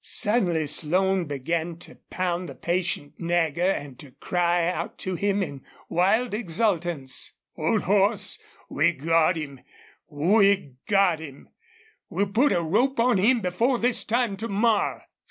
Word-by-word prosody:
Suddenly 180 -8 +1
Slone 180 +5 +1
began 160 +4 -3
to 175 - -13 0.2
pound 180 -1 -2
the - - -9
patient 170 -4 -2
Nagger 170 0 +1
and 145 -8 -4
to 145 - -11
cry 175 +1 0
out 180 - -3
to 185 - -4
him 200 +2 0
in 140 -6 -7 0.3
wild 200 +7 +2
exultance. 175 - -1 0.2
"Old 175 +7 0
horse, 200 +1 +1 0.3
we've 160 +3 +1
got 165 +4 +2
him!... 140 -4 -6 0.5
We've 195 - +2
got 195 -5 +3
him!... 140 -4 -11 0.6
We'll 195 +3 -1
put 255 +8 +3
a 170 - +1
rope 235 +11 +1
on 235 -4 +3
him 230 +5 +3
before 225 +8 +1
this 240 0 +1
time 230 -3 0
to 225 +3 -4
morrow!" 215 0 +1
180 Hz, 140 wpm, -25 LUFS, 160-205 Hz, 0.6 s, got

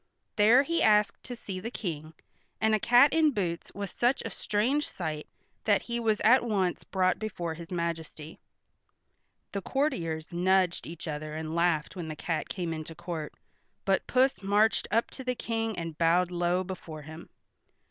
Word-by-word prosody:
There 230 +5 +6
he 335 +3 0
asked 210 -1 +4
to 245 - -5
see 195 -5 -6
the 220 +5 -5
King, 160 -9 -5 0.5
and 220 0 +2
a 215 - +3
cat 245 +6 +6
in 320 -1 +5
boots 180 -10 -3
was 200 -1 -4
such 245 +3 +1
a 225 - -4
strange 250 +12 0
sight 155 -4 -4 0.4
that 205 -2 +3
he 235 0 -3
was 220 -2 +1
at 240 +5 +6
once 195 -6 0
brought 185 -1 +1
before 175 -6 -3
his 165 +1 -10
majesty. 165 -3 -4 1.1
The 200 - -3
courtiers 175 - -2
nudged 185 0 +2
each 170 +1 -8
other 155 0 -4
and 160 0 -4
laughed 170 -1 +1
when 175 -3 -5
the 155 - -5
cat 165 +1 -3
came 175 -4 -3
into 160 +1 -6
court, 170 -3 -5 0.5
but 195 -1 +1
Puss 260 -1 +2
marched 205 +3 +2
up 230 +2 +1
to 265 - -7
the 250 0 -1
King 225 -2 -2
and 165 -2 -4
bowed 175 +2 +3
low 175 +1 +1
before 170 -5 -7
him. 160 +2 -10
185 Hz, 170 wpm, -29 LUFS, 165-220 Hz, 1.1 s, There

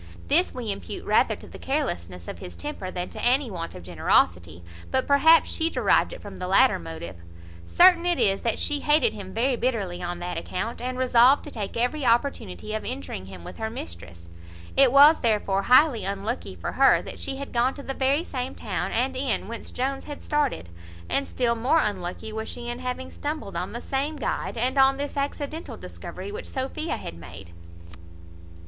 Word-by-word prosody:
This 335 +6 +4
we 235 -4 -3
impute 195 - -6
rather - - +3
to - - -13
the - - -11
carelessness 90 - -3
of 85 - -7
his 90 -1 -9
temper 185 - -5
than 180 -1 -4
to - - -8
any 255 0 +3
want 170 -3 -5
of 90 - -9
generosity; 85 0 +1 0.3
but 260 - +1
perhaps 305 +4 +5
she 325 0 +1
derived - - +2
it - - -9
from - - -9
the 180 - -4
latter 190 - +4
motive. 85 +1 -8 0.5
Certain 350 -1 +6
it 350 -2 +2
is 195 -1 +2
that 230 - 0
she 295 -1 -1
hated 295 +2 +3
him 195 -3 -8
very 250 +5 +1
bitterly 205 -8 -2
on 175 0 -3
that 175 0 -4
account, 225 +6 -4
and 255 +1 -3
resolved 255 +2 +5
to 295 - -9
take 210 -4 -5
every 250 +5 0
opportunity 230 -4 0
of 215 - -3
injuring 90 +1 -5
him 95 -3 -10
with - - -10
her 220 0 -2
mistress. 85 - -9 0.5
It 270 -2 +6
was 290 +4 +8
therefore 210 -4 +1
highly 250 0 +5
unlucky 200 +5 -3
for - - -4
her, - - +4
that - - -8
she 270 - -3
had 280 +1 -7
gone 245 +2 +2
to 280 - -9
the 270 - -4
very 275 +4 +1
same 255 -5 -4
town - - -3
and 260 +3 0
inn 260 -6 -1
whence 230 +1 -6
Jones 270 +2 -3
had 290 -1 -8
started, 290 - -1 0.4
and 275 - 0
still 240 -2 +1
more 245 +7 +2
unlucky 200 - -3
was 220 0 -4
she 240 -1 -6
in 240 +1 -4
having 255 +1 -4
stumbled 300 +1 -5
on - - -3
the - - -6
same 280 +3 -2
guide, 280 - -3
and 255 +4 +1
on 270 0 +5
this 285 +1 -4
accidental 285 +3 -4
discovery 405 - -8
which 455 +4 -6
Sophia 285 +4 -3
had - - -7
made. 85 +1 -11
240 Hz, 195 wpm, -25 LUFS, 185-275 Hz, 0.5 s, was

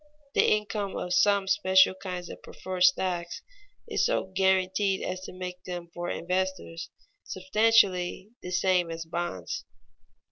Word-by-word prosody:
The - - +4
income 210 -1 -1
of 180 - -3
some 200 +1 +3
special 190 -9 +4
kinds 180 -2 -6
of - - -9
"preferred 185 -1 -7
stocks" 180 -1 +1 0.4
is - - 0
so 335 - 0
guaranteed 190 +1 +1
as 185 0 -4
to - - -8
make 180 0 -7
them 175 -1 -6
for 175 0 -4
investors 180 -1 -3 0.3
substantially 190 -1 +2
the 180 - -7
same 180 -1 +2
as 165 0 -5
bonds. 160 - -4
185 Hz, 135 wpm, -28 LUFS, 180-190 Hz, 0.4 s, The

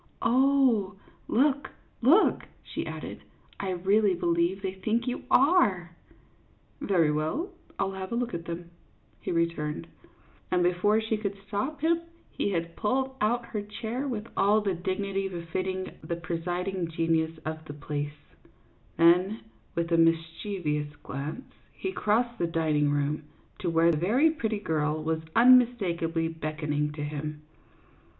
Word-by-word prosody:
Oh, 255 -6 +3 0.3
look, 275 +2 +2 0.3
look," 305 - +5 0.2
she - - -5
added, - - -6 0.2
" - - -29
I 195 - -2
really 195 +2 +3
believe 170 +3 +1
they 190 -1 -2
think 215 +5 -1
you 250 - -3
are! 205 - +4 0.4
" - - -35
"Very 175 - +3
well, 155 - -1 0.3
I'll 195 0 0
have 190 -1 -6
a - - -1
look 240 0 -1
at 170 0 -4
them," 170 0 -6 0.5
he - - -3
re 170 -1 +3
turned; 150 - -4 0.6
and 180 -1 +2
before 180 +5 +3
she 220 0 -1
could 200 -2 -3
stop 265 +9 -3
him 335 +1 +2 0.3
he - - -1
had 170 -3 -2
pulled 265 +4 0
out 235 +3 +1
her 210 - -1
chair 225 +6 -4
with 225 -5 -3
all 205 +2 +4
the 200 -2 0
dignity 195 +2 -2
befitting 185 +1 -3
the 170 +2 -2
presiding 175 +2 -2
genius 165 0 0
of 155 0 -4
the 145 - -7
place; 145 0 -5 0.7
then, 180 +6 +4 0.3
with 170 0 -1
a 165 - +4
mis 165 0 +5 0.3
chievous 150 -8 -2
glance, 145 - -6 0.2
he 380 - -4
crossed 235 - 0
the 170 - +1
dining 155 -3 +1
room, 145 +1 0 0.4
to 180 - -1
where 165 0 +4
a 165 - +3
very 235 - +3
pretty 220 -8 -2
girl 155 -4 -1
was 160 0 -1
unmistakably 205 -10 +4
beckon 155 -2 -3
ing 150 0 0
to 150 -1 -5
him. 150 0 -5
180 Hz, 150 wpm, -28 LUFS, 165-220 Hz, 0.7 s, look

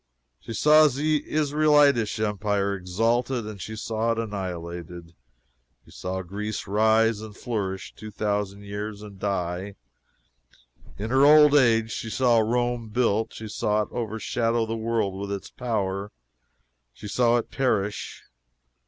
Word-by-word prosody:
She 115 - -8
saw 155 +1 +6
the 150 +2 0
Israelitish 145 -6 +3
empire 105 -1 0
exalted, 115 +6 0
and 105 -3 -8
she 110 - -6
saw 110 +1 -1
it - - -7
annihilated. 85 -5 -6 0.7
She - - -18
saw 95 +1 -4
Greece 105 +4 -5
rise, 110 +2 +2
and 110 -2 -10
flourish 100 -6 -4
two 110 - -9
thousand 105 -1 -2
years, 105 +1 -6
and 100 -2 -11
die. 95 0 -3 1.2
In 110 +4 -4
her 135 +1 +4
old 150 0 +7
age 115 -5 +4
she 115 - -4
saw 120 +1 +3
Rome 120 0 0
built; 110 -1 0
she 110 - -7
saw 105 0 0
it - - -10
overshadow 115 0 -1
the 115 0 -3
world 115 -3 -1
with 100 0 -5
its 100 -2 -5
power; 100 -4 -2 0.8
she 105 - -10
saw 120 +3 +3
it 120 - -4
perish. 105 -6 -1
110 Hz, 135 wpm, -25 LUFS, 100-120 Hz, 1.2 s, old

